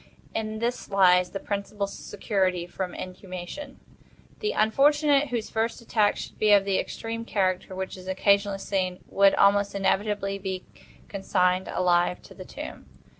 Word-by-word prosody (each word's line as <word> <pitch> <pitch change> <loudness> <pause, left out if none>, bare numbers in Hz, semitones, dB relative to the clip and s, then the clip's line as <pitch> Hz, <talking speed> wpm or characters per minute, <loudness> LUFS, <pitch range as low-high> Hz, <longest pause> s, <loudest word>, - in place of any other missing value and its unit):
In 220 -1 -3
this 235 +2 -3
lies 180 -2 +4
the 195 - -5
principal 200 0 -3
security 190 -3 -2
from 180 0 -5
inhumation. 185 +9 -8 0.6
The 430 - -1
unfortunate 285 +6 +3
whose 240 -4 -3
first 225 +1 -1
attack 215 -3 +1
should - - -8
be 210 -1 +5
of 200 -1 +5
the 195 -1 +1
extreme 230 0 -4
character 185 -4 -1
which 190 0 -4
is 185 0 -12
occasionally 200 +1 +2
seen, 185 -2 -2
would 195 0 +4
almost 200 0 +3
inevitably 195 0 0
be 190 -1 -4 0.4
consigned 185 -2 +1
alive 175 0 +1
to - - -13
the - - -10
tomb. - - -9
200 Hz, 145 wpm, -26 LUFS, 185-215 Hz, 0.6 s, be